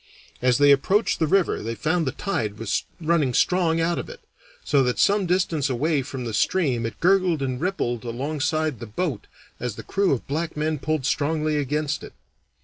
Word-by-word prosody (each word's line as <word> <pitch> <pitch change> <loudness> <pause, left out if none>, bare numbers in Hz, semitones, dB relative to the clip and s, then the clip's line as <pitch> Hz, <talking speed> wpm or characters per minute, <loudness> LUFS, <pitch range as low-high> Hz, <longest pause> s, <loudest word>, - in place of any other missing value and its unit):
As 125 -1 +3
they 145 0 +6
approached 190 +10 +2
the 160 - +2
river 190 +2 +2
they 115 +2 -4
found 160 +4 0
the - - +1
tide 120 - -3
was 110 -2 -1
running 155 -6 +1
strong 170 -3 +2
out 170 +1 +1
of - - -6
it, - - -10 0.5
so 140 - +3
that 125 -1 0
some 200 -2 +3
distance 170 -5 +1
away 145 +4 +1
from 130 -1 -6
the 115 - -4
stream 125 - +1
it 115 - -9
gurgled 180 -4 +3
and 130 -1 -3
rippled 125 - -1
alongside 145 +3 -2
the 120 - -7
boat 120 - -3 0.3
as 120 -3 -3
the - - -8
crew 195 -1 +1
of 135 - -1
black 155 +3 -3
men 155 0 -1
pulled 155 -2 -1
strongly 155 +2 0
against 150 +1 -1
it. - - -10
150 Hz, 190 wpm, -24 LUFS, 125-170 Hz, 0.5 s, they